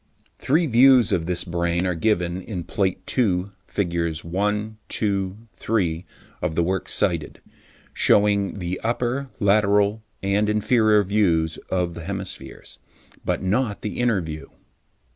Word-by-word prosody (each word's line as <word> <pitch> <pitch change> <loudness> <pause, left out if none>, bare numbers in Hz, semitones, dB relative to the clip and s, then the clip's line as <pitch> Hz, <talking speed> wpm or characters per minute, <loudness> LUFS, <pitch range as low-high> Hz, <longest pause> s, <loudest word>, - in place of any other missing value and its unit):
Three 160 +6 +2
views 125 -3 +5
of 85 -2 0
this 90 -1 0
brain 85 0 -1
are 90 - +1
given 90 0 0
in 90 -3 -5
Plate 95 -1 -2
II, 100 -6 +1 0.2
figs. 85 -4 -2
1, 105 +5 -2
2, 100 -2 -1 0.2
3, 90 -6 -1 0.4
of 80 - -2
the 85 - +2
work 95 +2 -2
cited, 85 -6 0 0.5
shewing 100 -1 +3
the 90 -1 -4
upper, 125 +4 -1
lateral 105 0 +3 0.2
and 100 +2 +1
inferior 105 0 +3
views 85 -6 +1
of 90 -2 0
the 85 - -8
hemispheres, 95 0 -7 0.4
but - - -1
not 105 +3 0
the 105 - -4
inner 120 -6 +2
view. 80 -2 -7
100 Hz, 130 wpm, -23 LUFS, 85-105 Hz, 0.5 s, views